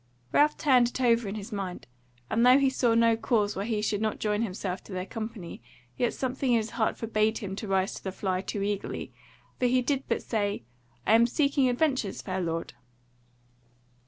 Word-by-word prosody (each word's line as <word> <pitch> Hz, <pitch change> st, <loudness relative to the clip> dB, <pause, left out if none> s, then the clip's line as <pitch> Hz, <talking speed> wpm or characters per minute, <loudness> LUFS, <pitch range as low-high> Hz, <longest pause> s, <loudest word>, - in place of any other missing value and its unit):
Ralph 300 Hz, +1 st, +4 dB
turned 255 Hz, -4 st, +4 dB
it 245 Hz, -, -6 dB
over 235 Hz, -3 st, +3 dB
in 200 Hz, -, -4 dB
his 215 Hz, +2 st, -7 dB
mind; 195 Hz, -3 st, -5 dB, 0.4 s
and 230 Hz, -, +1 dB
though 250 Hz, +2 st, +7 dB
he 275 Hz, -1 st, +3 dB
saw 240 Hz, -3 st, +2 dB
no 230 Hz, 0 st, +4 dB
cause 220 Hz, -2 st, 0 dB
why 195 Hz, -, -2 dB
he 215 Hz, -2 st, -1 dB
should 210 Hz, -1 st, 0 dB
not 220 Hz, -1 st, -1 dB
join 210 Hz, 0 st, 0 dB
himself 190 Hz, -3 st, -3 dB
to -, -, -12 dB
their 185 Hz, 0 st, -3 dB
company, 220 Hz, -, -7 dB, 0.3 s
yet 240 Hz, -, +1 dB
something 260 Hz, 0 st, -2 dB
in -, -, +5 dB
his 220 Hz, 0 st, -2 dB
heart 225 Hz, -2 st, 0 dB
forbade 220 Hz, -1 st, +1 dB
him 195 Hz, -2 st, -5 dB
to 215 Hz, -, -5 dB
rise 190 Hz, 0 st, +1 dB
to -, -, -9 dB
the 190 Hz, -, -3 dB
fly 185 Hz, -1 st, -2 dB
too 200 Hz, +1 st, -3 dB
eagerly; 205 Hz, -1 st, -3 dB, 0.5 s
so 250 Hz, -, +3 dB
he 250 Hz, +1 st, +2 dB
did 275 Hz, +1 st, -1 dB
but -, -, -1 dB
say: 205 Hz, -, -1 dB, 0.4 s
"I -, -, +4 dB
am 230 Hz, +1 st, +6 dB
seeking 280 Hz, 0 st, +2 dB
adventures, 255 Hz, -6 st, 0 dB
fair 190 Hz, 0 st, -2 dB
lord." 165 Hz, -1 st, -3 dB
220 Hz, 200 wpm, -28 LUFS, 200-245 Hz, 0.5 s, though